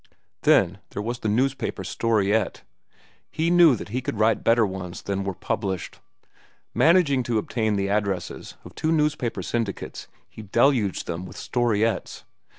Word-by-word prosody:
Then - - +3
there 105 - -5
was 120 +2 -3
the 110 - -2
newspaper 125 -2 0
storiette. 105 +1 0 0.7
He 165 +2 0
knew 170 -6 +7
that 105 - -8
he 125 +4 -2
could 120 - -4
write 110 0 +2
better 115 -1 +4
ones 95 -2 -6
than 100 -1 -2
were 95 -1 -3
published. 95 -2 -3 0.7
Managing 160 -5 +4
to 120 -2 -1
obtain 110 0 -1
the 100 0 0
addresses 100 -2 -2
of - - -11
two 160 - -1
newspaper 150 - 0
syndicates, 115 0 -4 0.2
he - - -11
deluged 110 -1 +1
them 85 +2 -5
with - - -12
storiettes. 115 -2 -1
110 Hz, 150 wpm, -24 LUFS, 100-125 Hz, 0.7 s, knew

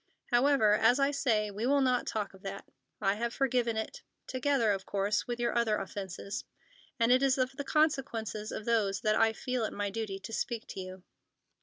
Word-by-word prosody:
However, 245 -4 +4
as 240 +4 +4
I 275 +1 +3
say, 220 -7 +1
we 210 +4 -2
will 280 +1 +4
not 255 -2 +2
talk 210 -2 -2
of 190 - -16
that. 195 0 -7 0.3
I 195 -1 +2
have 235 +3 -3
forgiven 245 -4 +1
it, 355 - -4 0.2
together, 255 -3 +1
of 195 -1 -1
course, 200 +1 0
with 240 -1 -3
your 240 - 0
other 230 -3 +2
offences. 195 +1 -5 0.6
And 230 +1 +4
it 255 +1 +5
is 270 -1 +3
of 255 0 +1
the 285 - -4
consequences 270 -8 0
of 215 - -5
those 210 -5 +1
that 215 -1 +2
I 225 0 +4
feel 250 +2 -2
it - - -2
my 205 -1 -2
duty 210 -2 -3
to 195 +3 -9
speak 230 0 -2
to - - -6
you." 185 0 -8
225 Hz, 200 wpm, -31 LUFS, 205-255 Hz, 0.6 s, it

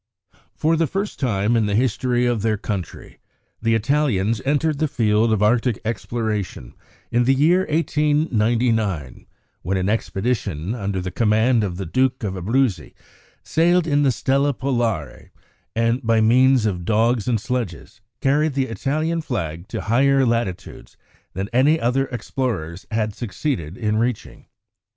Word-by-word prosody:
For 160 +1 +1
the 165 0 +1
first 195 +6 -4
time 110 -3 +1
in 110 -2 +2
the 100 - 0
history 125 +1 +1
of 120 -3 0
their 110 0 +1
country, 100 -3 -6 0.4
the 115 0 +2
Italians 115 -4 +1
entered 145 +1 +1
the 155 - +2
field 110 -4 +2
of 105 -1 +1
Arctic 120 +1 +2
exploration 110 - -3 0.4
in 120 0 +2
the 135 +2 +4
year 170 +7 +3
1899, 120 - 0 0.3
when 95 +3 -1
an 95 +1 0
expedition 105 -5 -2
under 100 -5 -3
the 90 0 -4
command 110 +2 +2
of 90 -3 -3
the 95 - -4
Duke 130 +7 0
of 100 -3 -2
Abruzzi 100 - -1 0.5
sailed 175 +2 +2
in 145 -2 +2
the 140 -2 +3
Stella 140 +3 +1
Polare, 120 - -2 0.5
and 115 +3 +1
by 115 -2 +2
means 125 +2 +4
of 90 -5 -1
dogs 115 +3 +1
and 120 -3 +1
sledges 115 - -5 0.2
carried 145 +2 +2
the 135 -3 0
Italian 155 +8 -1
flag 90 - -4
to - - -4
higher 135 +4 +3
latitudes 115 -6 -3 0.4
than 95 +2 -3
any 145 +6 +4
other 135 +2 +1
explorers 115 - -4
had 110 -1 -1
succeeded 100 - -4
in 105 -1 0
reaching. 120 0 -3
115 Hz, 145 wpm, -21 LUFS, 105-135 Hz, 0.5 s, the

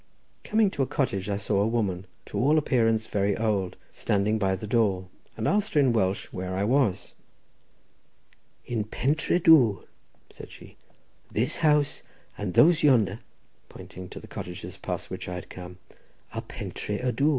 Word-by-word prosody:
Coming 215 -2 +2
to 140 - -3
a 135 - +1
cottage, 100 -8 -1
I 100 - 0
saw 105 -1 0
a 105 - +2
woman, 100 -5 -1 0.2
to - - -4
all 145 +5 +4
appearance 115 -6 +2
very 100 -1 0
old, 105 -4 0 0.2
standing 105 +2 0
by 95 -2 +1
the 95 - -7
door, 100 -5 +1 0.3
and 110 - -1
asked 205 -2 +1
her - - +6
in 130 -4 +4
Welsh 95 -3 0
where 95 0 -4
I 95 - 0
was. 115 -4 +1 1.5
"In 115 -3 -1
Pentré 145 +10 0
Dwr," 130 - +5 0.5
said - - -11
she. - - -14 0.6
"This 115 +4 +1
house 150 -2 +2 0.3
and 95 -4 -4
those 165 0 +6
yonder," 115 -8 +3 0.5
pointing 90 0 -10
to - - -8
the - - -12
cottages 90 0 -7
past - - -5
which - - -5
I 90 - -4
had 90 - -8
come, 90 -1 -9 0.6
"are - - -3
Pentré 105 +3 -5
y 125 - +1
Dwr. 140 +6 +2
110 Hz, 165 wpm, -27 LUFS, 95-135 Hz, 1.5 s, her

